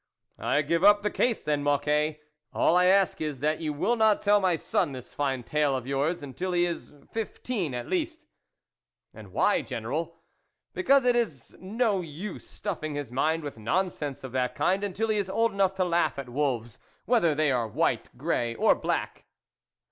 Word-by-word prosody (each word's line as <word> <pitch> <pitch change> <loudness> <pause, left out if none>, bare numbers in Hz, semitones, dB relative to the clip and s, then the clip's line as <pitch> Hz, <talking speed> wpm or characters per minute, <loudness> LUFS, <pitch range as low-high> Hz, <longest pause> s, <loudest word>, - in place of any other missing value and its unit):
" - - -44
I 150 - +1
give 165 +4 0
up 205 0 +6
the 210 - 0
case, 240 -3 0
then, 150 -1 0
Mocquet: 150 +1 +1 0.4
all 170 - +3
I 180 0 +5
ask 190 -2 +3
is, 150 -4 -3
that 155 +1 +1
you 155 -2 -1
will 180 +11 +1
not 220 -2 +3
tell 205 0 +5
my 185 -3 +2
son 145 -2 0
this 130 -1 -9
fine 135 -3 -1
tale 150 +1 +1
of 130 -2 -4
yours, 140 +5 -1
until 180 +7 -4
he 175 0 +3
is 170 -1 -5 0.2
fifteen 215 - -3
at 120 - -5
least." 320 -2 -2 0.4
" - - -58
And - - -12
why, - - +2
General? - - -4 0.2
" - - -46
" - - -57
Because 275 -8 +3
it 245 -1 +4
is 185 - -2
no 210 0 0
use 175 +5 -7
stuffing 155 -7 -4
his 145 -5 -5
mind 155 +5 0
with 145 -6 -7
nonsense 150 - -2
of 130 - -6
that 125 -1 -1
kind, 190 +2 +1
until 205 +3 -2
he 215 - +2
is 200 -2 -1
old 230 +3 +2
enough 195 -1 +1
to 185 -1 +1
laugh 175 -3 +1
at 135 -2 -6
wolves, 120 -4 -2 0.3
whether 175 -11 +3
they 155 -1 +2
are 120 -3 0
white, 110 - 0
grey 120 -1 -1
or - - +4
black." - - -3
165 Hz, 195 wpm, -27 LUFS, 145-205 Hz, 0.4 s, up